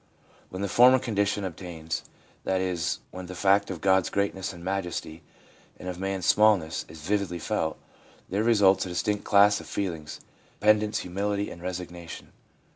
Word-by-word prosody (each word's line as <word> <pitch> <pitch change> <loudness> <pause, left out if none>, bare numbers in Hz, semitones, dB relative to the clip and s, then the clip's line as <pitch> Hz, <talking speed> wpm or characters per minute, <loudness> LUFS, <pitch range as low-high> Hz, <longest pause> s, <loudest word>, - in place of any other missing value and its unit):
When 95 +2 -5
the - - 0
former 125 +6 +6
condition 105 -5 -1
obtains 85 -3 -5 0.2
— - - -32
that 95 0 0
is, 90 -3 -1
when 95 -1 -8
the 90 - -8
fact 100 +2 +3
of 90 -5 -5
God's 95 -1 +3
greatness 100 -1 -1
and 85 -2 -11
majesty, 90 -4 -3 0.6
and - - -9
of 90 -1 -5
man's 95 -2 -2
smallness, 100 -7 +3
is 80 0 -11
vividly 100 0 -1
felt, 80 -1 -2 0.5
there 100 +3 -1
results 105 -4 +4
a - - -6
distinct 105 +4 -1
class 100 0 +5
of - - -11
feelings, 85 -6 -4 0.4
dependence^ 105 0 +3
humility 100 +3 -2
and 85 - -10
resignation. 90 -2 -7
95 Hz, 160 wpm, -27 LUFS, 90-100 Hz, 0.6 s, former